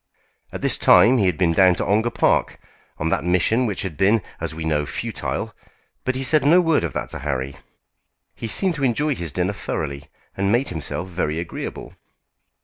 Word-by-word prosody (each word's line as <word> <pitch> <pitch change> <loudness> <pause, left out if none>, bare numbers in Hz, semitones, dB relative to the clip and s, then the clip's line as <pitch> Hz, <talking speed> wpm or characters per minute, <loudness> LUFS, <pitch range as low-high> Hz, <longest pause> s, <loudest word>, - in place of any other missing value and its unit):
At - - -7
this - - +2
time 125 +2 +6
he 100 - +3
had 90 - 0
been 90 -3 +2
down 90 +1 +5
to - - -2
Ongar 110 +5 +2
Park, 115 - +1 0.4
on 80 - -1
that 75 - 0
mission 90 +8 +2
which 105 - -3
had 90 -6 -5
been, 100 +3 +3 0.2
as - - -4
we 80 0 -5
know, 75 -2 +1
futile; - - -4 0.5
but 130 - 0
he 130 - -2
said 150 +4 +3
no 160 +6 +6
word 165 - +2
of 80 -6 -3
that - - -4
to - - -7
Harry. 65 -1 -3 0.8
He 115 - -6
seemed 185 - +2
to 150 -3 -5
enjoy 145 +4 +1
his 85 - -6
dinner 90 +7 -1
thoroughly, 70 -7 -4 0.3
and 100 +1 0
made 120 +4 +1
himself 85 +2 -3
very 85 -4 -2
agreeable. 85 - -6
95 Hz, 195 wpm, -22 LUFS, 80-120 Hz, 0.8 s, time